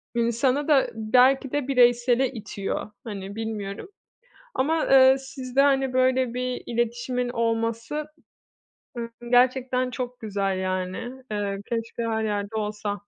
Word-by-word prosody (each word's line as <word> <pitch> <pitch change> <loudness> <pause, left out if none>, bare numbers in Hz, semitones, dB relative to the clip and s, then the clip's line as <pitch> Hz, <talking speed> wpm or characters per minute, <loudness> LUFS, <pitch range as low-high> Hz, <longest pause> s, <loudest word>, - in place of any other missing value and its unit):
insanı 240 +4 +1
da 285 -4 +4
belki 250 +4 +3
de 290 -3 -1
bireysele 245 0 +3
itiyor, 205 -2 -5
hani, 200 -2 -7
bilmiyorum 215 - -5 0.7
ama, 310 +4 +1
eee, 265 0 +7
sizde, 265 -1 -1
hani, 270 -2 +2
böyle 255 -1 +2
bir 250 0 -3
iletişimin 240 +1 -1
olması, 230 +4 -1 0.9
eee, 235 0 -4 0.2
gerçekten 255 0 +3
çok 250 -1 -5
güzel 200 -4 -1
yani. 185 0 -2 0.3
Eee, 205 -1 -2
keşke 230 0 -3
her 220 -1 -1
yerde 205 0 -2
olsa. 210 -1 -3
240 Hz, 120 wpm, -25 LUFS, 215-260 Hz, 0.9 s, eee